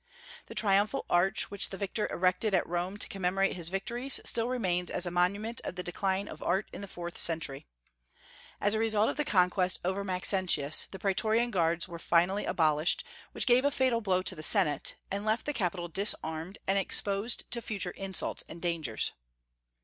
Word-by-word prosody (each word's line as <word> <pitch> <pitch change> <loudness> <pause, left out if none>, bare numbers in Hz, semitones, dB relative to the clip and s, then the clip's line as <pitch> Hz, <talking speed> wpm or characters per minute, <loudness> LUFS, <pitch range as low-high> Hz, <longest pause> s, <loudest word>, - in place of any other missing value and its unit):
The - - -10
triumphal 210 +5 +2
arch 180 +3 +2
which 200 - 0
the 195 - -6
victor 200 +2 -2
erected 185 +3 +1
at 180 - +2
Rome 175 +3 -3
to - - +2
commemorate 195 0 0
his 170 -2 -4
victories 235 +8 -1
still 230 +1 +1
remains 180 -8 -1
as 180 - -1
a 175 - -3
monument 200 +6 0
of - - -5
the 180 - -4
decline 190 +2 -1
of - - -9
Art 195 +2 0
in - - -7
the 200 - -6
fourth 175 -2 -6
century. 155 -5 0 0.9
As 205 - +2
a 220 - 0
result 220 -1 +2
of - - -3
the 300 - +1
conquest 180 -5 +2
over 190 +2 -1
Maxentius, 180 -5 +2
the 190 - -8
Praetorian 220 +5 +1
guards 170 -2 +1
were 170 -2 -8
finally 175 +5 +2
abolished, 155 -1 +2 0.3
which - - 0
gave 250 +1 +5
a 285 - +4
fatal 260 -4 +1
blow 185 -3 +1
to - - 0
the 155 - -8
Senate, 150 -2 +3 0.2
and 200 +1 -2
left 215 +2 0
the 295 - -1
capital 180 -6 -2
disarmed 170 -1 -1
and 195 +1 +2
exposed 200 +3 +1
to 235 - -1
future 215 -3 -2
insults 195 -2 -2
and 170 - -9
dangers. 165 -10 -1
190 Hz, 185 wpm, -30 LUFS, 175-210 Hz, 0.9 s, gave